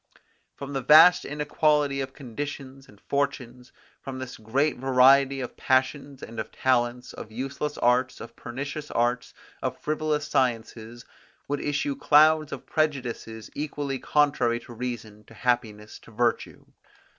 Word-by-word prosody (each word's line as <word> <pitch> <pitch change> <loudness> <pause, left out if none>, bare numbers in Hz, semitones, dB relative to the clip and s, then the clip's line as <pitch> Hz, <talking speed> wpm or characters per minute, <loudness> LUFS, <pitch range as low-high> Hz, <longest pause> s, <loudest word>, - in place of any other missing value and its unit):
From 140 0 -7
the 135 - -1
vast 155 +7 +7
inequality 150 -1 +1
of 135 0 -5
conditions 135 +1 -7
and 105 - -19
fortunes, 125 -3 -3 0.3
from 135 -1 -7
the 130 -1 -7
great 135 +8 0
variety 135 +1 +4
of 125 - -6
passions 135 +1 0
and 115 0 -8
of 110 - -5
talents, 125 -1 0
of 110 - -9
useless 135 +5 -4
arts, 125 +1 +1
of 115 - -10
pernicious 140 +4 -6
arts, 120 +1 -1 0.3
of - - -3
frivolous 150 -1 -1
sciences, 120 -4 -2 0.4
would 145 0 -2
issue 145 -1 -1
clouds 155 +2 +4
of - - -7
prejudices 125 -7 -3
equally 145 -2 -4
contrary 140 -6 +1
to 120 0 -12
reason, 115 -3 -6
to 115 - -16
happiness, 110 -3 -2
to - - -18
virtue. 115 +1 -2
130 Hz, 135 wpm, -26 LUFS, 120-145 Hz, 0.4 s, vast